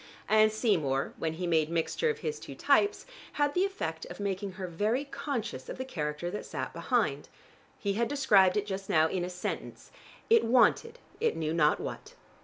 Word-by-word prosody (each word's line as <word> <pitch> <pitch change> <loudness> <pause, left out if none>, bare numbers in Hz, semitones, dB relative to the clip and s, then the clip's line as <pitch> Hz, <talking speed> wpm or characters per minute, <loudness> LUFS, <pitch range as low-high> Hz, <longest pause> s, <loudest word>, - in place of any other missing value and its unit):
And 215 0 +5
Seymour, 165 - 0
when 160 -1 -1
he 180 +3 -4
made 160 -3 +2
mixture 170 - 0
of 450 - -3
his 455 -1 -2
two - - -9
types, 405 - +2 0.3
had 290 -1 +1
the 365 +2 +2
effect 160 - -4
of 175 - -9
making 200 -1 -3
her 190 0 -5
very 210 - -1
conscious 240 - -4
of - - -5
the 260 - -4
character 150 - -3
that 210 - -4
sat - - -5
behind. - - 0 0.5
He 200 -1 -1
had 230 +3 0
described 210 -10 +4
it 205 - 0
just 195 -1 -5
now 160 0 +4
in 180 +2 -2
a 180 - -3
sentence: 180 0 -6 0.4
it 460 0 +5
wanted 260 - +3 0.2
it 465 - +1
knew 160 -1 -1
not 150 -3 +3
what. - - -7
195 Hz, 190 wpm, -30 LUFS, 165-260 Hz, 0.5 s, And